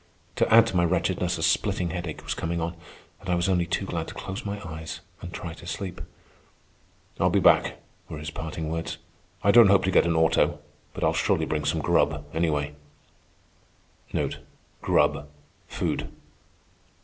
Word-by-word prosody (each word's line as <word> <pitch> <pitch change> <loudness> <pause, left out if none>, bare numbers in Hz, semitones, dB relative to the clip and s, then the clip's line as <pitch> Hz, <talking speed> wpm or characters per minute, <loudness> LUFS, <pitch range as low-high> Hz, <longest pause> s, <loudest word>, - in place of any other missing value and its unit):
To - - +2
add 115 +1 +8
to 95 - -4
my 85 - +4
wretchedness 90 +1 0
a 80 - -3
splitting 85 +2 +1
headache 85 -2 -5
was - - -2
coming 85 +1 -2
on, 85 +1 -3 0.4
and 95 - -9
I 90 - +3
was 85 +1 0
only 90 -3 +1
too 95 - -1
glad 80 -3 -3
to - - -9
close 95 0 -6
my 100 0 -4
eyes 80 0 -7 0.2
and 85 - -7
try 85 -1 -6
to 85 - -12
sleep. 95 0 -5 1.2
"I'll - - +4
be - - +3
back," - - +4 0.3
were 80 - -6
his 75 0 -6
parting 80 0 -5
words. 80 0 -3 0.5
"I 100 - +5
don't 115 -1 +8
hope 100 0 +5
to 95 - +1
get 85 - +4
an 85 - +1
auto, 80 -2 +3 0.4
but - - -4
I'll - - +3
surely - - +1
bring 75 -1 -2
some - - 0
grub, 75 0 +1
anyway." 75 -3 0 2.9
Food. - - -2
85 Hz, 165 wpm, -26 LUFS, 80-90 Hz, 2.9 s, add